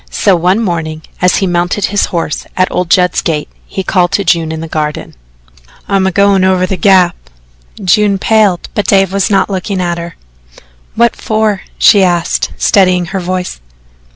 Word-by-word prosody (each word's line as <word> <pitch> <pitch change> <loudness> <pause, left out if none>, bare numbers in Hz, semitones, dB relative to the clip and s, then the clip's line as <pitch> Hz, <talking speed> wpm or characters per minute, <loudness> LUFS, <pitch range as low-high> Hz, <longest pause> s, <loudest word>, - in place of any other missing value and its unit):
So 195 -3 +2
one 180 +4 +1
morning 160 -5 -3 0.2
as 180 0 +3
he 195 - 0
mounted 175 +2 0
his 205 0 0
horse 165 -3 -4
at 185 0 +1
old 180 -2 -2
Judd's 180 0 +2
gate, 150 -3 -2 0.2
he 190 - -4
called 180 -1 +1
to 200 - +1
June 165 -3 +1
in 160 - -5
the 165 - -6
garden: 150 -1 -4 0.7
"I'm 195 -1 +1
a - - 0
goin' 200 0 +3
over 185 -1 +2
to - - -8
the - - +1
Gap." 180 -1 +3 0.7
June 200 +2 +2
paled, 205 -3 +1
but 205 -3 -2
Dave 195 -1 +2
was 195 -1 0
not 195 -2 +2
looking 195 0 -3
at 175 -1 -2
her. 170 0 -8 0.8
"What 235 0 +2
for?" 215 -3 -1 0.2
she 205 -3 +5
asked, 175 -2 0
steadying 185 -3 +2
her 195 - -1
voice. 180 - -4
185 Hz, 180 wpm, -12 LUFS, 175-195 Hz, 0.8 s, she